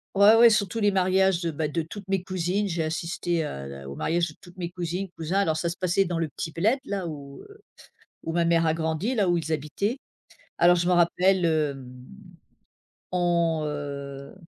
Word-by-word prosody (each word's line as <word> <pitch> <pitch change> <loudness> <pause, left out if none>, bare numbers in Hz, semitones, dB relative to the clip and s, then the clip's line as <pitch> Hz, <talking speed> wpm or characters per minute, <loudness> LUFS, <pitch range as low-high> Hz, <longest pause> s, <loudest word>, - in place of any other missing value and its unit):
Ouais, 200 +2 +7
ouais. 235 +1 +8
Surtout 215 0 0
les 205 -1 +3
mariages 190 -1 +2
de, 170 -2 -1
bah, 155 0 -2
de 165 +3 -2
toutes 195 +5 -10
mes 190 -2 0
cousines. 185 +2 -1
J'ai 165 -2 -1
assisté 165 +1 -2
à 70 - -6
la 70 0 -9
au 70 - -7
mariage 170 +1 0
de 155 - -13
toutes 175 +1 -16
mes 175 -1 -4
cousines, 180 +2 -3
cousins. 170 +5 -1
Alors 160 -6 +1
ça 170 - -1
se 170 - -6
passait 185 +2 +1
dans 175 -2 -2
le 165 -2 -1
petit 160 +3 -6
bled 220 - +1
là 200 -2 -3
où, 140 -3 -8
heu, 415 +1 -16 0.6
où 165 - -3
ma 170 0 +2
mère 165 0 +3
a 160 - +2
grandi, 160 +9 -1
là 200 -5 +2
où 175 - +3
ils 160 -1 -2
habitaient. 155 - -2 0.6
Alors 175 +1 +6
je 175 0 0
me 180 - +4
rappelle, 180 +2 +3
hem, 145 -5 -1 1.2
on, 170 -3 +1
heu 140 -1 -6
170 Hz, 205 wpm, -26 LUFS, 160-190 Hz, 1.2 s, ouais